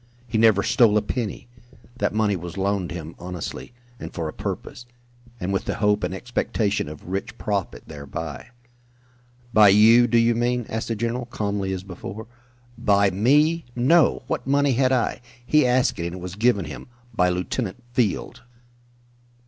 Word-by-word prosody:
He 115 -1 -1
never 110 -3 +5
stole 110 -3 +4
a - - +3
penny. 115 -1 -4 0.5
That - - +1
money 105 -2 +1
was 85 0 -7
loaned 95 -2 -1
him 85 -1 -6
honestly 90 +3 -6 0.3
and - - -7
for 80 -3 -4
a 75 - -6
purpose 120 - -6 0.5
and 95 0 -2
with 95 - -1
the - - -2
hope 105 -1 +1
and - - -1
expectation 105 -3 -1
of 75 +1 -11
rich 100 +4 -4
profit 100 -4 -3
thereby." 70 0 -7 1.1
"By 105 -2 +7
you, 115 +4 +6
do 120 - +2
you 115 0 +4
mean?" 120 +1 0
asked 110 0 -3
the 115 - -2
general, 120 +3 -2
calmly, 100 -4 -2
as 95 -1 -4
before. 100 +3 -8 0.5
"By 100 -1 +3
me? 150 - +3
No! 150 +7 +3
What - - -3
money 140 0 +3
had 130 +1 +2
I? 125 -2 0 0.2
He 150 0 +4
asked 125 -4 +2
it 85 - -2
and 85 - -6
it - - -7
was 90 0 -7
given 110 0 +2
him - - -9 0.3
by 90 -4 +2
Lieutenant 95 +5 -3
Field." 115 -6 -1
105 Hz, 165 wpm, -23 LUFS, 95-120 Hz, 1.1 s, By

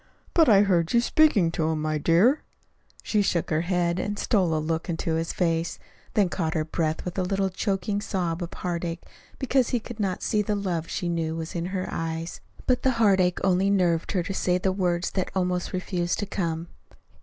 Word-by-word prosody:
"But 325 -5 +5
I 200 -3 +7
heard 175 -3 +1
you 235 - +6
speaking 240 - +4
to 160 -1 0
him, 160 -1 -1
my 155 -1 0
dear." 190 - +4 0.6
She 210 - +1
shook 180 -5 0
her 155 0 +2
head, 175 0 0
and 205 +2 -2
stole 185 -8 +1
a - - +1
look 160 +2 -2
into 165 -1 -1
his 165 +1 -1
face, 165 -1 0 0.4
then 205 -3 +4
caught 165 -3 -2
her 155 -1 0
breath 160 -1 -2
with 180 +1 -3
a - - +2
little 195 +1 0
choking 200 +1 -1
sob 180 -5 -2
of 175 - -4
heartache 170 -1 -4 0.3
because 265 -2 +1
he 245 - +1
could 230 0 -9
not 190 -3 -1
see 215 -2 +1
the 210 0 -1
love 175 -5 -2
she 180 - -2
knew 165 -2 -1
was 165 0 -5
in 170 0 -2
her 185 0 -3
eyes. 165 +1 -4 0.2
But 250 -1 +2
the 260 - +2
heartache 190 -5 +3
only 190 +1 +3
nerved 175 -4 +1
her 180 -3 +1
to 195 - -4
say 180 -1 +1
the 190 +1 0
words 180 -2 0
that 185 - -1
almost 180 -1 0
refused 180 -1 -1
to 205 - -2
come. 170 -4 -3
180 Hz, 205 wpm, -26 LUFS, 165-200 Hz, 0.6 s, I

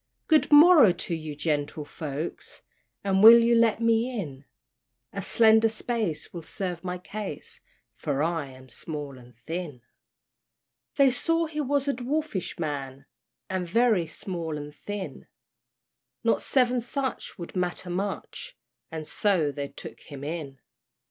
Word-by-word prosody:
"Good 310 -1 +4
morrow 295 - +8
to 175 0 -4
ye, 155 -2 -5
gentle 150 0 -2
folks, 150 +1 -6 0.4
And 195 -1 +2
will 225 +2 +11
you 235 0 +4
let 230 -1 +4
me 230 +1 +2
in? 140 -6 -7 0.7
A 200 - -3
slender 220 +2 +5
space 220 -6 -3
will 170 - -6
serve 175 0 -5
my 180 0 -3
case, 195 -3 -7 0.3
For 140 +2 -2
I 165 -3 -1
am 130 0 -14
small 145 +1 -6
and 120 -1 -17
thin." 150 -2 -6 1.1
They 275 -2 +5
saw 330 +6 +1
he 305 -1 -3
was 285 0 0
a 280 - +2
dwarfish 260 - -3
man, 140 -4 -4 0.4
And 185 -2 -3
very 220 -4 +3
small 165 -1 -5
and 145 0 -8
thin; 205 +4 -7 1.0
Not - - +2
seven 250 -2 +2
such 260 0 -4
would 170 0 -8
matter 180 0 -2
much, 200 - -4 0.3
And 160 -2 -6
so 180 -8 +1
they 140 0 -4
took 140 - -10
him 140 -2 -10
in. 150 -3 -5
180 Hz, 140 wpm, -27 LUFS, 150-230 Hz, 1.1 s, will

